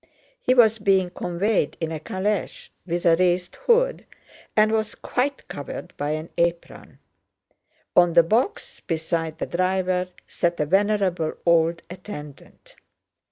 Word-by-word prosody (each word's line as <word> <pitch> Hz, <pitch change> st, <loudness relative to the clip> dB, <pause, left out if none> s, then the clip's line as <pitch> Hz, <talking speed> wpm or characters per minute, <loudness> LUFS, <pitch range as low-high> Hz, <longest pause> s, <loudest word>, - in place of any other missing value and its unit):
He 255 Hz, -, +2 dB
was 225 Hz, -3 st, +5 dB
being 190 Hz, -3 st, +2 dB
conveyed 180 Hz, -1 st, -1 dB
in 165 Hz, -1 st, -3 dB
a 160 Hz, -, -4 dB
calèche 190 Hz, +5 st, -3 dB, 0.2 s
with 175 Hz, +1 st, -2 dB
a 165 Hz, -1 st, +6 dB
raised 180 Hz, 0 st, +1 dB
hood, -, -, +3 dB, 0.5 s
and 215 Hz, 0 st, +5 dB
was 220 Hz, -1 st, -1 dB
quite 275 Hz, +3 st, -2 dB
covered 145 Hz, -, -7 dB
by 145 Hz, +1 st, -3 dB
an 155 Hz, +1 st, -5 dB
apron. 170 Hz, 0 st, -2 dB, 1.0 s
On 175 Hz, -1 st, +5 dB
the 170 Hz, 0 st, +7 dB
box 230 Hz, -, -1 dB
beside 160 Hz, -1 st, -3 dB
the -, -, -3 dB
driver 185 Hz, 0 st, 0 dB, 0.2 s
sat 175 Hz, -1 st, -1 dB
a 150 Hz, -, +1 dB
venerable 190 Hz, -2 st, +1 dB
old 165 Hz, 0 st, +3 dB
attendant. 170 Hz, -5 st, -11 dB
180 Hz, 130 wpm, -24 LUFS, 165-205 Hz, 1.0 s, the